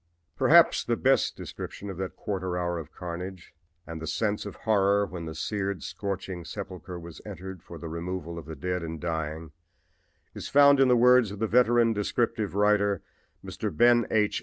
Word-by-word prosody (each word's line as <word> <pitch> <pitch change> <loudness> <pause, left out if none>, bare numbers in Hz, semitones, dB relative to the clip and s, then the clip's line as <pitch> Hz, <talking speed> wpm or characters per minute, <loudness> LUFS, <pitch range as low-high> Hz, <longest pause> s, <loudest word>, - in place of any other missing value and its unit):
Perhaps - - +5
the - - 0
best - - +2
description 100 - -7
of 95 -3 -6
that 95 0 -4
quarter 95 -3 -3
hour 85 -1 -1
of 80 -1 -9
carnage 90 +1 -7 0.3
and 80 0 -7
the 80 - -5
sense 105 +5 -1
of 100 - -8
horror 100 -2 +2
when 90 -4 -7
the 80 -1 -6
seared, 100 +1 -3
scorched 95 -1 -4 0.2
sepulchre 90 -3 -7
was 85 -1 -11
entered 95 -3 -8
for 85 - -11
the 85 - -7
removal 85 0 -5
of 75 - -12
the 80 - -6
dead 90 +5 -2
and 80 -1 -5
dying 80 -1 -4 0.8
is - - -7
found 140 0 +6
in 135 - +6
the 125 -1 +5
words 125 -2 +5
of 100 - -7
the 110 - 0
veteran 120 0 +4
descriptive 105 -1 -1
writer, 100 -1 +2 0.4
Mr. - - -3
Ben 120 +7 +4
H. 105 -2 +1
95 Hz, 180 wpm, -27 LUFS, 85-105 Hz, 0.8 s, found